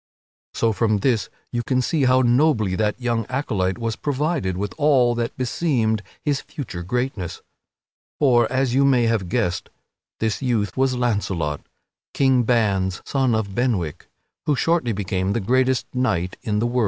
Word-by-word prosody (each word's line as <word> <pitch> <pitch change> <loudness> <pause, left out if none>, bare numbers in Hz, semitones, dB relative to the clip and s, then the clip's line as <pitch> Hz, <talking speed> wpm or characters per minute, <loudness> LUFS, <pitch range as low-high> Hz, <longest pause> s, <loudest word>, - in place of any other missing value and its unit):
So 115 -1 +2
from 110 -1 +1
this 115 +1 0 0.2
you 120 - -1
can 130 +1 0
see 145 +1 +1
how 130 0 +4
nobly 120 -5 +3
that 105 +3 0
young 120 -2 0
acolyte 105 -9 -1
was 115 -2 -2
provided 145 - -1
with 100 +1 -3
all 135 -5 +4
that 120 0 -3
beseemed 125 -5 0 0.2
his 145 -3 +1
future 120 - -7
greatness. 100 -3 -3 0.7
For, 120 -5 +3
as 130 -2 +1
you 135 +2 +4
may 130 -3 +4
have 115 -6 0
guessed, 95 -5 -1 0.5
this 110 +2 -1
youth 115 -7 0
was 130 -1 +1
Launcelot, 100 - -1 0.5
King 130 -2 +4
Ban's 100 -6 +1
son 130 -4 +1
of 105 -3 -2
Benwick, 100 - -1 0.4
who 150 - +3
shortly 165 -4 +1
became 95 -1 -1
the 115 - 0
greatest 130 +4 +1
knight 100 -9 0
in 105 -1 -1
the 110 - +1
world. 120 +1 0
120 Hz, 155 wpm, -22 LUFS, 105-130 Hz, 0.7 s, how